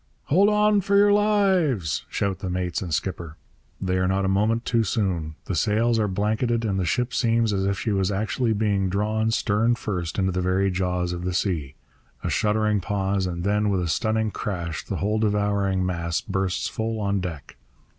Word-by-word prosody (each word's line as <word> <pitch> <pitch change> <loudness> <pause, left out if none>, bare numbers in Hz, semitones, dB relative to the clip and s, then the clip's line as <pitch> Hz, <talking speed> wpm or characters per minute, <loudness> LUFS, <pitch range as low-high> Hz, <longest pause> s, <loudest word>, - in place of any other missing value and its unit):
'Hold 195 +8 +5
on 210 -1 +3
for 200 +2 +2
your 205 0 +6
lives!' 190 - +2
shout 100 -2 -1
the 95 - -4
mates 90 -1 -2
and 90 -3 -5
skipper. 85 0 -3 0.4
They 95 -1 -1
are 95 - +1
not 95 +1 +1
a - - +1
moment 110 +4 +1
too 115 -2 +2
soon. 90 -8 -1
The - - -3
sails 110 +6 +2
are 105 - +1
blanketed, 110 +4 0
and 95 -3 0
the 90 - 0
ship 125 0 0
seems 115 -3 +2
as 95 0 0
if 100 0 0
she 110 - -2
was 95 -1 +1
actually 110 +4 0
being 100 -3 +1
drawn, 110 +3 0
stern 110 +1 +2
first, 90 -7 -4
into 95 -1 +1
the 90 0 -1
very 95 +2 +1
jaws 90 -1 -1
of 85 0 -5
the 90 -1 -2
sea. 80 -8 -1 0.5
A - - -1
shuddering 105 -1 +1
pause... 95 -1 -1
and 85 -1 -4
then, 105 +1 +1
with 95 -2 +1
a 85 - -2
stunning 110 +6 0
crash, 85 -6 -4
the - - -4
whole 105 +2 0
devouring 100 -3 +1
mass 85 -2 -1
bursts 95 -2 -2
full 110 0 -3
on 100 -1 0
deck. 85 -6 -7
100 Hz, 195 wpm, -24 LUFS, 90-110 Hz, 0.5 s, your